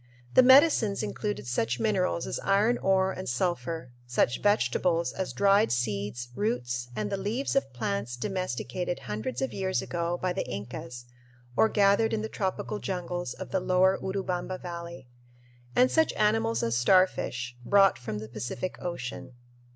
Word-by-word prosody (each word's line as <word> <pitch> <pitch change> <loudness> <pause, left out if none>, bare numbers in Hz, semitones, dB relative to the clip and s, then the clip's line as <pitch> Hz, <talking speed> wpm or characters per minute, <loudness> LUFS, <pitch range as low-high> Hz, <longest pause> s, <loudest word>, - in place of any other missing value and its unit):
The - - +8
"medicines" 260 -5 +5
included 205 - -3
such 120 0 -1
minerals 185 -5 0
as - - -3
iron 210 +5 +2
ore 190 0 +2
and 185 -4 -5
sulphur; 145 -1 -2 0.2
such 120 0 +1
vegetables 180 -4 +1
as 190 -1 -3
dried 200 +2 +3
seeds, 120 0 -2
roots, 125 - -2
and 105 -1 -3
the - - -1
leaves 225 +9 -2
of 275 - +1
plants 120 -1 -3
domesticated 180 0 -3
hundreds 120 +1 -4
of 130 - -3
years 190 -1 -1
ago 170 0 -2
by 185 -1 -1
the 190 - -2
Incas 120 +4 -6 0.5
or 220 - +4
gathered 205 +2 +3
in 215 -1 -1
the 220 - -4
tropical 200 +1 -3
jungles 175 -5 -4
of - - -8
the 190 - +1
lower 185 +1 +3
Urubamba 185 -1 -3
Valley; 170 -5 -8 0.7
and 255 +1 +4
such 320 0 +3
animals 210 - +1
as 115 0 0
starfish 125 -4 +2
brought 195 +5 +4
from 120 -4 -5
the 110 +1 -6
Pacific 120 - -5
Ocean. 135 -6 -6
180 Hz, 150 wpm, -28 LUFS, 125-195 Hz, 0.7 s, The